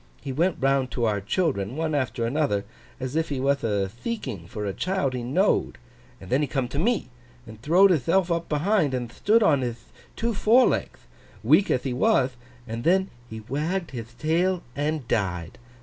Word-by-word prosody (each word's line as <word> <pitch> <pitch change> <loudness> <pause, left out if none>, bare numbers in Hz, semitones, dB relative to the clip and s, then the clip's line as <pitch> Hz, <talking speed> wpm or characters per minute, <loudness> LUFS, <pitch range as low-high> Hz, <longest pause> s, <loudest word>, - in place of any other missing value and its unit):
He 135 - -6
went 170 +7 +1
round 135 -1 +2
to 120 - 0
our 105 -2 0
children, 120 - -1
one 160 0 -1
after 130 -4 -1
another, 120 -6 0 0.3
as 130 +2 -4
if 160 0 0
he 140 -3 -2
wath 140 +1 +1
a 100 -3 0
theeking 120 - -5
for 105 +3 -5
a 100 - -2
child 180 - -1
he 125 - -3
know'd; 145 +12 +1 0.4
and 95 - -12
then 130 +3 +3
he 150 - 0
come 135 -2 -1
to 140 - -3
me, 215 - 0 0.3
and 110 -1 -12
throwd 180 +8 +5
hithelf 175 +4 +2
up 170 0 -1
behind, 155 -2 +1
and 120 -2 -4
thtood 220 - +3
on 145 -8 +4
hith 120 -2 -5 0.2
two 230 0 -1
forelegth, 225 +5 +2 0.4
weak 200 - +4
ath 125 - +1
he 130 - -2
wath, 130 0 +2 0.3
and 115 +1 -5
then 190 +4 +2 0.2
he 110 0 -7
wagged 155 - -2
hith 120 -1 -8
tail 175 +3 +1
and 150 -2 -2
died. 90 -7 -2
140 Hz, 185 wpm, -25 LUFS, 120-170 Hz, 0.4 s, throwd